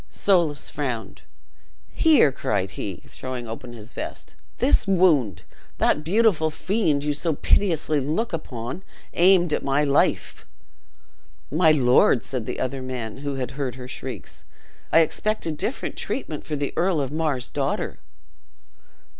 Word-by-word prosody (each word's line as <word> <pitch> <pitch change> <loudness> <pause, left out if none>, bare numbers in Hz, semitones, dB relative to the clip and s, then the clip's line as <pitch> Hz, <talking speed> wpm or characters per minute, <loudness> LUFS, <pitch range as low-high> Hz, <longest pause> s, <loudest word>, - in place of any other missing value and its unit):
Soulis 170 -7 +1
frowned: 125 -6 -4 0.7
"Here!" 300 - +5
cried 100 -7 -2
he, 95 -2 -6
throwing 125 -2 -6
open 120 +2 -7
his 115 0 -10
vest: - - -6 0.2
"this 255 -4 +3
wound, 150 - +3 0.3
that 150 - +2
beautiful 180 -3 +3
fiend 160 -4 0
you 150 0 0
so 155 +1 -1
piteously 160 -4 +2
look 160 - -2
upon, 125 -1 -5 0.3
aimed 175 -2 +4
at - - 0
my 140 +2 +2
life!" 140 -1 +1 1.1
"My 160 +2 +5
lord," 125 -3 +4
said 125 -4 -3
the - - -4
other 130 +1 -2
man, 125 -4 -5
who 140 0 -4
had 130 -2 -3
heard 135 -3 -3
her 125 -1 -8
shrieks, - - -6 0.5
"I 165 - +7
expected 165 0 0
different 235 - -3
treatment 160 - -4
for 155 - -2
the 145 -1 -3
Earl 175 -1 +1
of 135 -2 -2
Mar's 150 -5 -1
daughter." - - -2
145 Hz, 140 wpm, -24 LUFS, 130-170 Hz, 1.1 s, I